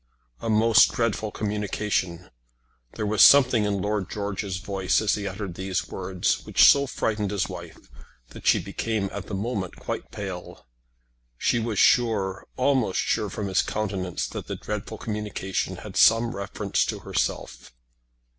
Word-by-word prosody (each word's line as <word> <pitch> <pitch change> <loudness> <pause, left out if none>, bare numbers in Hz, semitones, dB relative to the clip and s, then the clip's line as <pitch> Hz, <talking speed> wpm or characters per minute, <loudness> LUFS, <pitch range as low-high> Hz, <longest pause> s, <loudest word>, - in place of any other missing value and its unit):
"A 115 - -3
most 110 +1 +5
dreadful 110 -2 -1
communication!" 105 -4 -2 0.6
There 110 - -3
was 105 -1 +1
something 125 -6 +7
in 100 -2 -1
Lord 105 -3 -1
George's 100 -2 -3
voice 95 -1 0
as 110 -1 +1
he 100 -1 -2
uttered 95 -1 -5
these 95 +1 -3
words 90 -1 -1
which - - +3
so 140 0 +6
frightened 105 -5 -1
his 100 -2 -1
wife - - -9 0.5
that - - -9
she - - +6
became 110 -4 -3
at - - -6
the 100 - -4
moment 100 -3 -3
quite - - -5
pale. 95 -3 -7 0.7
She 120 - +1
was 110 -2 -3
sure, 100 -6 +2
almost 130 -7 +1
sure 110 -2 0
from 105 +2 -4
his 95 -1 +2
countenance 95 -4 -3
that - - -7
the - - -4
dreadful 105 +1 -5
communication 105 -3 -3
had - - -10
some 115 +1 +4
reference 100 0 -1
to - - -4
herself. - - -3
105 Hz, 150 wpm, -25 LUFS, 95-110 Hz, 0.7 s, something